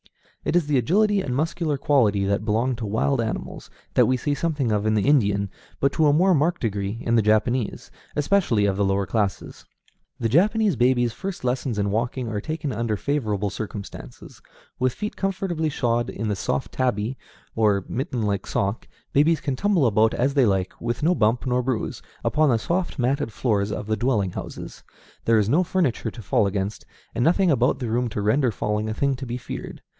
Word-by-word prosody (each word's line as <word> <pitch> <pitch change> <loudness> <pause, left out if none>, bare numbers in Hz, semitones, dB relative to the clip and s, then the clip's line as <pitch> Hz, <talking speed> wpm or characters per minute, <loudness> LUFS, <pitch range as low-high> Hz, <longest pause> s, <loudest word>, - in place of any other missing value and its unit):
It - - -1
is 175 -3 +3
the 145 -3 +2
agility 200 - +2
and 130 -8 -3
muscular 160 0 -1
quality 110 -9 +2
that 100 +2 0
belong 115 +4 +1
to 115 - -4
wild 115 +5 +1
animals, 110 -1 -5 0.2
that - - +4
we 130 - +2
see 145 +4 -1
something 145 -6 -1
of 105 0 0
in 110 - +2
the 105 - +1
Indian, 100 -8 +2 0.3
but 140 - +2
to 155 - +3
a 145 - +4
more 185 +5 +4
marked 170 +3 +1
degree 100 -1 -2
in 115 - -1
the 115 - +5
Japanese, 110 +2 0 0.2
especially 145 - +2
of 100 -1 +1
the 100 - +1
lower 95 0 +1
classes. 100 -1 -2 0.5
The 115 - 0
Japanese 205 - +3
baby's 120 -1 +2
first 190 +6 -6
lessons 125 -2 -1
in 100 -1 0
walking 120 +3 -1
are 105 -2 -3
taken 155 0 -3
under 110 -1 -1
favorable 105 -7 -1
circumstances. 105 -1 -8 0.4
With 130 -1 +1
feet 210 - -4
comfortably 185 -5 -1
shod 120 -4 0
in 110 +2 -4
the 105 - 0
soft 95 +7 -2
tabi, 125 -1 -1 0.4
or 105 -3 +2
mitten 125 -2 -3
like 100 -2 -1
sock, 100 +3 -2 0.3
babies 155 +3 +3
can 140 -3 -2
tumble 195 -3 +2
about 110 -1 +3
as 135 +3 +1
they 135 -4 +4
like, 95 -2 0
with 120 +3 -2
no 170 +3 +4
bump 110 -5 +1
nor 125 0 +1
bruise, 125 -2 -3 0.2
upon 155 0 +3
the 120 - +3
soft 170 +11 -2
matted 125 -2 0
floors 105 -3 0
of - - -4
the 110 +1 0
dwelling 105 -4 0
houses. - - -8 0.4
There 115 -1 +4
is 105 -2 +2
no 165 +9 +4
furniture 170 - 0
to 115 +1 -10
fall 100 - +2
against, 100 +1 -3 0.3
and 120 - 0
nothing 180 +4 +3
about 125 0 +2
the 125 -4 -4
room 120 +1 0
to 105 - -3
render 120 +4 +2
falling 105 +1 -2
a 110 - -3
thing 140 +2 +1
to 130 0 -6
be 120 +1 -3
feared. - - -8
120 Hz, 200 wpm, -24 LUFS, 105-145 Hz, 0.5 s, the